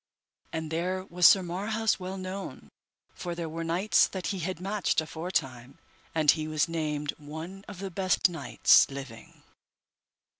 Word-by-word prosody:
And 160 Hz, -1 st, -4 dB
there 185 Hz, +3 st, -1 dB
was 175 Hz, -1 st, +5 dB
Sir 190 Hz, -, +6 dB
Marhaus 205 Hz, +5 st, -1 dB
well 185 Hz, +1 st, -5 dB
known, 190 Hz, +1 st, -7 dB, 0.4 s
for 175 Hz, -1 st, -5 dB
there 170 Hz, -1 st, -4 dB
were 165 Hz, +1 st, -4 dB
knights 175 Hz, +6 st, +3 dB
that 190 Hz, -2 st, -6 dB
he 190 Hz, -, -4 dB
had 180 Hz, +1 st, -3 dB
matched 195 Hz, -2 st, 0 dB
aforetime, 145 Hz, -6 st, -3 dB, 0.4 s
and 155 Hz, -2 st, +6 dB
he 155 Hz, -1 st, -3 dB
was 155 Hz, -2 st, +1 dB
named 150 Hz, -3 st, -2 dB
one 160 Hz, +6 st, -8 dB
of 205 Hz, -, -9 dB
the 195 Hz, 0 st, -5 dB
best 185 Hz, +1 st, +2 dB
knights 165 Hz, -5 st, +4 dB
living. 135 Hz, -4 st, -10 dB
170 Hz, 150 wpm, -28 LUFS, 155-190 Hz, 0.4 s, Sir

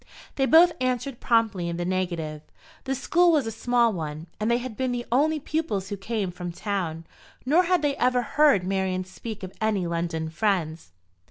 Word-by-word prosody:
They 270 Hz, -1 st, +1 dB
both 335 Hz, +4 st, +7 dB
answered 255 Hz, 0 st, -1 dB
promptly 220 Hz, -7 st, +1 dB
in 170 Hz, -, -3 dB
the 175 Hz, -, -2 dB
negative. 175 Hz, -5 st, -2 dB, 0.4 s
The 270 Hz, 0 st, -1 dB
school 345 Hz, +6 st, +3 dB
was 300 Hz, -6 st, +2 dB
a 225 Hz, -, -3 dB
small 235 Hz, 0 st, +2 dB
one, 155 Hz, -2 st, -5 dB
and 215 Hz, +1 st, 0 dB
they 235 Hz, -, +3 dB
had 245 Hz, -2 st, -6 dB
been 260 Hz, +2 st, -1 dB
the 245 Hz, 0 st, -3 dB
only 305 Hz, +5 st, +2 dB
pupils 285 Hz, -, -2 dB
who 205 Hz, -, -3 dB
came 200 Hz, -1 st, -3 dB
from 175 Hz, 0 st, -6 dB
town; 170 Hz, -4 st, -3 dB, 0.4 s
nor 325 Hz, +7 st, +4 dB
had 360 Hz, -2 st, +2 dB
they 285 Hz, -1 st, +1 dB
ever 250 Hz, -1 st, +2 dB
heard 285 Hz, -5 st, +3 dB
Marian 185 Hz, -1 st, -1 dB
speak 205 Hz, +3 st, -8 dB
of 185 Hz, -, -7 dB
any 210 Hz, -4 st, +1 dB
London 165 Hz, -1 st, -2 dB
friends. 165 Hz, -, -1 dB
215 Hz, 185 wpm, -25 LUFS, 180-255 Hz, 0.4 s, both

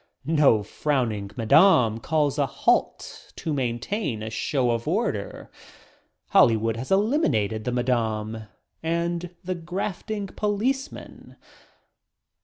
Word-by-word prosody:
No 145 Hz, -8 st, +4 dB
frowning 115 Hz, -4 st, -1 dB
"Madam" 115 Hz, -, +5 dB
calls 150 Hz, +1 st, 0 dB
a 140 Hz, -, +2 dB
halt -, -, -1 dB
to 160 Hz, -, -3 dB
maintain 125 Hz, -, -2 dB
a 110 Hz, -, -5 dB
show 125 Hz, +1 st, 0 dB
of 115 Hz, +2 st, -2 dB
order. 160 Hz, -, -2 dB, 0.8 s
Hollywood 115 Hz, -1 st, +4 dB
has 125 Hz, +3 st, -6 dB
eliminated 190 Hz, -, +1 dB
the 125 Hz, -, -1 dB
"madam" 110 Hz, -3 st, -1 dB, 0.4 s
and 170 Hz, +1 st, -2 dB
the 185 Hz, +1 st, -2 dB
grafting 195 Hz, +4 st, -4 dB
policeman. 220 Hz, +8 st, -3 dB
140 Hz, 100 wpm, -25 LUFS, 115-180 Hz, 0.8 s, Madam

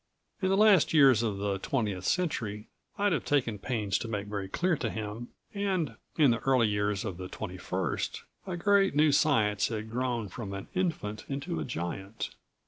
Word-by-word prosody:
In 190 Hz, -, +1 dB
the 195 Hz, -, +3 dB
last 205 Hz, -7 st, +5 dB
years 135 Hz, -7 st, +7 dB
of 110 Hz, -4 st, -1 dB
the 100 Hz, -1 st, -1 dB
twentieth 105 Hz, -7 st, -2 dB
century, 110 Hz, -, -1 dB, 0.3 s
I'd 205 Hz, -2 st, +2 dB
have -, -, 0 dB
taken 120 Hz, -8 st, 0 dB
pains 105 Hz, -4 st, -1 dB
to -, -, -4 dB
make 105 Hz, -2 st, -3 dB
very 100 Hz, -2 st, -4 dB
clear 175 Hz, -, +1 dB
to 125 Hz, -6 st, -2 dB
him, 110 Hz, +2 st, -5 dB, 0.3 s
and 190 Hz, -, -1 dB, 0.2 s
in 145 Hz, -6 st, +6 dB
the 115 Hz, -, +1 dB
early 130 Hz, -4 st, +3 dB
years 105 Hz, +1 st, 0 dB
of 95 Hz, -5 st, -4 dB
the 90 Hz, 0 st, -6 dB
twenty 95 Hz, -1 st, -6 dB
first, 90 Hz, -3 st, -2 dB, 0.2 s
a 180 Hz, -2 st, -3 dB
great 195 Hz, -1 st, +3 dB
new 150 Hz, 0 st, +5 dB
science 110 Hz, -9 st, +3 dB
had 110 Hz, -1 st, -5 dB
grown 120 Hz, -2 st, -1 dB
from 100 Hz, +1 st, -6 dB
an 100 Hz, 0 st, -7 dB
infant 160 Hz, -, -2 dB
into 140 Hz, +5 st, -3 dB
a -, -, -3 dB
giant. 95 Hz, 0 st, -4 dB
115 Hz, 185 wpm, -29 LUFS, 105-150 Hz, 0.3 s, years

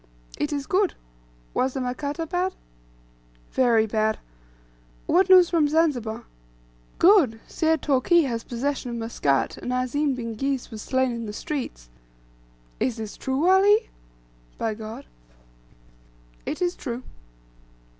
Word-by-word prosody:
"It 295 Hz, -, -1 dB
is 285 Hz, -1 st, -2 dB
good. 390 Hz, -1 st, +1 dB, 0.6 s
Was 260 Hz, +1 st, 0 dB
the -, -, -1 dB
Makata 285 Hz, +5 st, -3 dB
bad?" 360 Hz, +3 st, -1 dB, 1.0 s
"Very 235 Hz, -4 st, +3 dB
bad." 220 Hz, 0 st, 0 dB, 0.9 s
"What 370 Hz, +2 st, +3 dB
news 365 Hz, -2 st, +8 dB
from 325 Hz, -4 st, +3 dB
Zanzibar?" 290 Hz, -8 st, 0 dB, 0.7 s
"Good; 335 Hz, -, +5 dB
Syed 320 Hz, -1 st, 0 dB
Toorkee 300 Hz, +5 st, +4 dB
has 235 Hz, -5 st, -2 dB
possession 255 Hz, +1 st, -3 dB
of 235 Hz, -, -4 dB
Muscat, 185 Hz, -, 0 dB
and 250 Hz, -, -5 dB
Azim 255 Hz, +3 st, 0 dB
bin 230 Hz, -2 st, -4 dB
Ghis 270 Hz, +3 st, -2 dB
was 220 Hz, -1 st, -7 dB
slain 260 Hz, +1 st, +1 dB
in 230 Hz, -1 st, -5 dB
the 210 Hz, -, -6 dB
streets." 260 Hz, -, -5 dB, 0.9 s
"Is 250 Hz, -, 0 dB
this 220 Hz, -2 st, -6 dB
true, 265 Hz, +4 st, -1 dB
Wallahi?" 400 Hz, +4 st, +5 dB, 0.7 s
(by 225 Hz, -, -1 dB
God.) 215 Hz, -6 st, -8 dB, 1.4 s
"It 330 Hz, +4 st, -2 dB
is 355 Hz, 0 st, 0 dB
true." 245 Hz, -2 st, -5 dB
265 Hz, 125 wpm, -25 LUFS, 230-325 Hz, 1.4 s, news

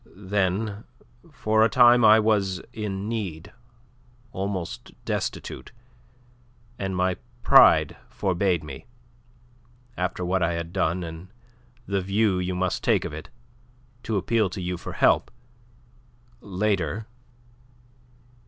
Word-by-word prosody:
Then 100 Hz, +2 st, -1 dB, 0.5 s
for 110 Hz, 0 st, +2 dB
a 115 Hz, -, +4 dB
time 120 Hz, +1 st, +6 dB
I 110 Hz, 0 st, +8 dB
was 100 Hz, -4 st, +1 dB
in 100 Hz, -2 st, -4 dB
need, 100 Hz, -9 st, -5 dB, 0.8 s
almost 95 Hz, -, -5 dB
destitute, 65 Hz, -, -4 dB, 1.1 s
and 95 Hz, -1 st, -3 dB
my 90 Hz, 0 st, 0 dB, 0.3 s
pride -, -, +6 dB
forbade 90 Hz, -3 st, 0 dB
me, 70 Hz, -3 st, -9 dB, 1.1 s
after 90 Hz, 0 st, -2 dB
what 90 Hz, +1 st, 0 dB
I 85 Hz, 0 st, +1 dB
had 85 Hz, 0 st, -5 dB
done 90 Hz, -1 st, 0 dB
and 80 Hz, +2 st, -8 dB, 0.6 s
the 100 Hz, -1 st, -1 dB
view 100 Hz, 0 st, +1 dB
you 90 Hz, 0 st, -2 dB
must 90 Hz, 0 st, -1 dB
take -, -, +2 dB
of -, -, -5 dB
it, 80 Hz, -, -8 dB, 0.7 s
to 110 Hz, -3 st, -2 dB
appeal 110 Hz, +1 st, +1 dB
to 95 Hz, -, -7 dB
you 90 Hz, 0 st, -3 dB
for 85 Hz, -, -8 dB
help. -, -, +3 dB, 1.1 s
Later..." 100 Hz, -1 st, -1 dB
95 Hz, 115 wpm, -25 LUFS, 90-105 Hz, 1.1 s, I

